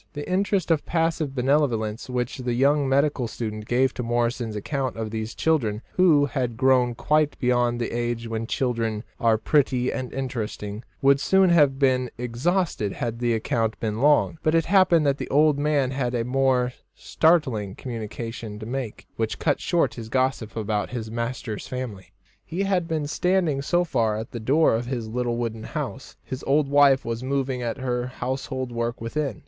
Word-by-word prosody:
The 145 0 -6
interest 190 -1 +1
of 155 -2 +2
passive 165 -4 -1
benevolence 125 -5 0
which 125 0 -2
the 125 -1 -1
young 140 +2 +3
medical 140 -2 +2
student 110 -2 -5
gave 130 +1 +2
to - - -4
Morrison's 120 -1 -1
account 135 +5 -2
of 110 -1 -4
these 110 +1 -4
children, 120 -9 0
who 160 -6 +5
had 125 -3 -2
grown 125 -2 +3
quite 150 +3 +1
beyond 120 -1 +1
the 120 - -2
age 120 0 -2
when 115 0 -3
children 115 -4 -1 0.2
are 115 -1 +3
pretty 130 +1 +1
and 130 -1 -4
interesting, 110 -5 -4 0.2
would 140 0 +5
soon 190 +3 +4
have 145 -5 +4
been 130 -2 +2
exhausted 125 - -1
had 115 -1 -4
the 120 -1 +1
account 110 0 -1
been 110 0 -2
long; 150 +2 +3
but 155 +1 +2
it 165 -1 +3
happened 180 -4 +4
that 140 0 +1
the - - -5
old 150 0 +4
man 145 -3 +1
had 125 -2 -1
a 115 -1 -1
more 125 -1 +1 0.2
startling 130 - +1
communication 115 -2 -6
to 110 - -8
make, 125 -2 -5
which 110 -1 -1
cut 145 -3 +1
short 175 -2 +1
his 115 -2 -8
gossip 130 -3 0
about 105 -2 -1
his 110 -3 -5
master's 115 -1 -4
family. 120 -8 -6 0.3
He 175 +4 -3
had 185 -4 0
been 160 -3 -1
standing 170 -2 +1
so 175 +5 +2
far 115 -10 0
at 110 +1 -6
the 120 - -5
door 140 +8 +3
of 115 +2 -1
his 120 -4 -3
little 120 0 -1
wooden 115 -2 -3
house. - - -6
His 130 - -6
old 145 +1 +3
wife 140 -1 +5
was 115 0 -3
moving 130 -1 -1
at 120 +1 -3
her 125 -2 -2
household 130 0 -4
work 115 0 -2
within. 130 0 -3
125 Hz, 175 wpm, -24 LUFS, 115-145 Hz, 0.3 s, who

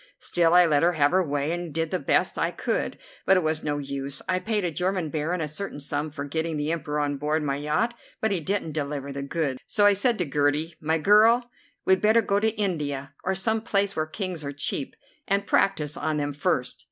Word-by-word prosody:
Still, 170 -1 +2
I 180 0 +8
let 150 -3 +3
her 175 +1 +3
have 145 -3 +3
her 185 +1 +3
way 145 -1 -1
and 175 -1 -4
did 165 +1 -2
the 185 - 0
best - - +1
I - - +2
could, - - -2 0.3
but 190 - +5
it 180 - +1
was 155 0 0
no 145 -1 -1
use. 140 -1 -3
I 185 0 +1
paid 210 -1 -1
a 175 - 0
German 180 0 -1
Baron 165 +3 -1
a 155 - -1
certain 155 +1 -5
sum 145 +1 -3
for 145 -1 -6
getting 160 +2 -2
the 150 +2 -1
Emperor 150 -2 -2
on 145 -1 -1
board 150 +2 0
my 140 -1 -1
yacht, 155 +11 0 0.3
but 220 - +1
he 190 - +2
didn't 175 0 -2
deliver 140 -2 -3
the 140 0 -5
goods. 140 -2 -2
So 205 - +2
I 205 - +7
said 225 +4 +1
to 180 - 0
Gertie: 145 +3 0
'My 160 +1 +1
girl, 225 +7 +5 0.3
we'd 190 0 +4
better 220 +2 +4
go 200 0 +1
to 220 +1 +2
India, 145 -9 -2
or 190 +1 0
some 220 +3 0
place 200 -3 0
where 155 0 -1
Kings 180 -1 -4
are 140 - -4
cheap, 140 -1 -2 0.3
and 200 +1 +1
practise 150 -8 +1
on 155 0 -1
them 145 -1 -2
first. 145 -4 -1
160 Hz, 225 wpm, -26 LUFS, 145-190 Hz, 0.3 s, I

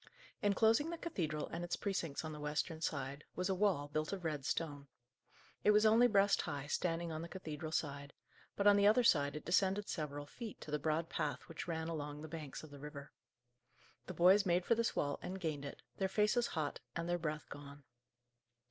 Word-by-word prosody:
Inclosing 225 +8 +4
the 340 - -4
cathedral 160 - -2
and 170 +1 -4
its 175 - -1
precincts 165 -7 -2
on 160 - -4
the 150 - -7
western 150 +2 -2
side, 140 -2 -3
was 180 +1 -1
a - - +3
wall, 185 -7 +2
built 155 +1 -2
of 190 -3 -4
red 150 -4 -2
stone. 145 -3 -2 0.8
It - - +4
was 210 +1 +6
only 225 +3 +7
breast 200 -3 +4
high, 140 -1 -4
standing 165 +2 -1
on 155 0 -3
the 170 - -6
cathedral 155 -4 -6
side; 140 -3 -2 0.4
but 200 - -1
on 205 0 +8
the 200 0 +5
other 225 +4 +5
side 145 -9 +4
it 150 - -6
descended 190 +3 +2
several 145 -3 -3
feet, 225 +8 -8
to 150 - -8
the 150 - 0
broad 155 +2 0
path 150 -2 -2
which 165 - -6
ran 160 -1 -2
along 150 -2 -4
the - - -5
banks 155 -3 -7
of 155 - -11
the 145 - -10
river. 145 -1 -8 1.0
The - - -6
boys 185 +4 +6
made 175 -1 +2
for - - +4
this 230 0 0
wall 145 - 0
and 190 +1 -5
gained 155 -5 -2
it, 140 - -8
their 190 -1 0
faces 210 +4 +2
hot, 150 -2 -1 0.2
and 170 0 -2
their 175 0 0
breath 150 -2 -3
gone. 145 0 -10
165 Hz, 205 wpm, -37 LUFS, 150-195 Hz, 1.0 s, on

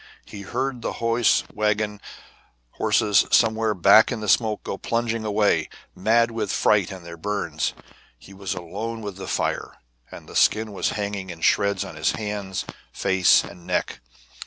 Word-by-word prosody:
He 100 - -9
heard 125 +5 -3
the - - -3
hose 115 0 +2
wagon 105 -1 -1 0.7
horses 105 -2 +2
somewhere 110 -2 +3
back 100 +6 +6
in 120 - -3
the 105 - -5
smoke 110 +1 +2
go - - -4
plunging 115 +2 -2
away, 105 -1 +1 0.3
mad 115 +4 +2
with 110 -3 -2
fright 100 -4 +2
and 95 -3 -9
their 85 0 -9
burns. 105 +4 -2 0.4
He 95 +10 -15
was 95 0 -4
alone 110 +7 -5
with 100 -2 -6
the 95 -1 -7
fire, - - -2 0.3
and - - -12
the - - -12
skin 110 0 +3
was 95 - -1
hanging 100 -2 -4
in 85 -2 -9
shreds 100 +4 +2
on 80 - -10
his 80 - +1
hands, 105 -3 -4 0.3
face, 95 -2 +3
and 85 - -12
neck. - - -2
105 Hz, 160 wpm, -23 LUFS, 95-110 Hz, 0.7 s, back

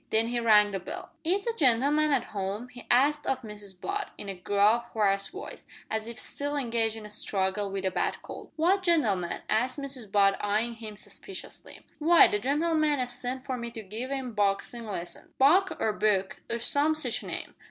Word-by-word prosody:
Then 225 +1 +2
he 240 0 0
rang 210 -3 +5
the 195 - -2
bell. 180 - -7
"Is 375 +5 0
the 465 - 0
gen'leman 290 - +3
at 270 -5 0
'ome?" 200 +4 -3
he 245 -1 -13
asked 290 +4 +3
of 260 -1 -1
Mrs 205 -3 -9
Butt, 405 - -3
in 200 - -7
a - - -2
gruff, 205 +5 +2
hoarse 200 -2 +2
voice, 395 - -9 0.2
as 220 0 -2
if 235 -1 -7
still 285 +1 -3
engaged 230 -5 0
in 220 -1 -9
a - - -9
struggle 200 -1 -1
with 195 0 -3
a 190 - +1
bad - - -1
cold. - - -9
"What 360 +5 +3
gentleman?" 225 - +1
asked 250 +5 +1
Mrs 265 -7 -6
Butt 195 -1 +3
eyeing 215 +3 +1
him 220 -2 -8
suspiciously. 380 - -9 0.2
"W'y, 335 +2 +7
the 210 - +1
gen'leman 300 +4 +2
as 250 -1 -1
sent 255 +2 -4
for 260 -2 -2
me 235 -1 -5
to 225 -1 -8
give 220 +6 -5
'im 265 -3 -3
boxin' 205 +3 0
lessons 175 -4 -6
Buck 360 +8 +4
or 215 - +1
Book, 200 -3 +1
or 235 - -1
some 290 +5 +2
sitch 310 - -1
name." - - -5
235 Hz, 195 wpm, -28 LUFS, 205-285 Hz, 0.2 s, W'y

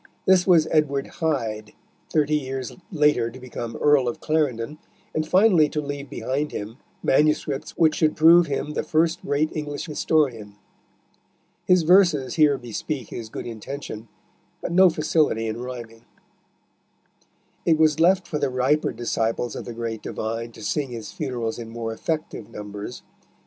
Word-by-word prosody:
This 185 -1 +4
was 165 -4 +5
Edward 140 -3 +1 0.2
Hyde, 110 -9 -1 0.4
thirty 150 -1 +1
years 135 -3 -4 0.2
later 150 -8 +2
to 125 +3 -12
become 120 -2 -6
Earl 145 0 +3
of 120 - -3
Clarendon, 150 -3 -1 0.3
and 155 0 -1
finally 180 -4 +5
to 150 - -2
leave 145 -1 -5
behind 145 +3 -2
him 105 +4 -6 0.3
manuscripts 150 -1 +1
which 160 -2 +4
should 155 -1 +2
prove 165 +2 +7
him 145 +1 -2
the - - -1
first 165 +2 +1
great 145 +2 -1
English 145 -2 -4
historian. 135 - 0 1.1
His 180 -2 +5
verses 165 -7 +4
here 150 -3 +4
bespeak 120 +2 -5
his 115 -2 -7
good - - -6
intention, 115 0 -7 0.5
but - - -5
no 185 +1 +6
facility 155 -7 +1
in 110 +2 -4
rhyming. 120 -2 -8 1.6
It 160 -2 +3
was 155 0 +3
left 185 +2 +4
for 150 - -2
the - - +1
riper 130 +4 +1
disciples 115 0 -2
of - - -6
the 120 - -6
great 115 -1 -4
divine 115 +1 -4
to 110 - -11
sing 145 +4 -1
his 115 -3 -7
funerals 120 -3 -3
in 115 -1 -7
more 115 -1 -4
effective 155 -4 -4
numbers. 105 +3 -8
140 Hz, 150 wpm, -24 LUFS, 115-155 Hz, 1.6 s, prove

